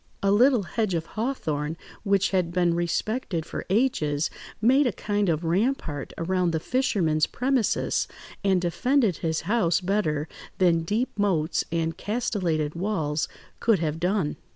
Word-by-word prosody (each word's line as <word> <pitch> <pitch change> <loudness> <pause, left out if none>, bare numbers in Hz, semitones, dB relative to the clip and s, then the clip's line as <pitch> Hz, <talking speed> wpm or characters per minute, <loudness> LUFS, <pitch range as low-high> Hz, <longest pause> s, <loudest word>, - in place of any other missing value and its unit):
A 195 - +3
little 240 +1 +5
hedge 190 +2 -1
of 165 -1 -2
hawthorn, 160 - -2 0.2
which 200 -2 +2
had 180 -3 +1
been 175 -1 +2
respected 175 +1 -1
for - - -6
ages, 165 - +1 0.3
made 260 +6 +4
a - - +1
kind 205 0 -1
of 160 0 0
rampart 170 - -1
around 180 +1 +1
the 160 - +1
fisherman's 170 - +1
premises, 255 -3 0 0.4
and 190 -2 +3
defended 220 - +1
his 160 -1 -1
house 175 -4 +2
better 180 -6 0 0.3
than 170 -3 +3
deep 215 +10 -1
moats 175 -6 +1
and 165 -1 -1
castellated 180 -9 -1
walls 165 -5 -1 0.3
could 225 -3 +3
have 160 -2 -2
done. 180 -3 0
180 Hz, 140 wpm, -26 LUFS, 160-215 Hz, 0.4 s, little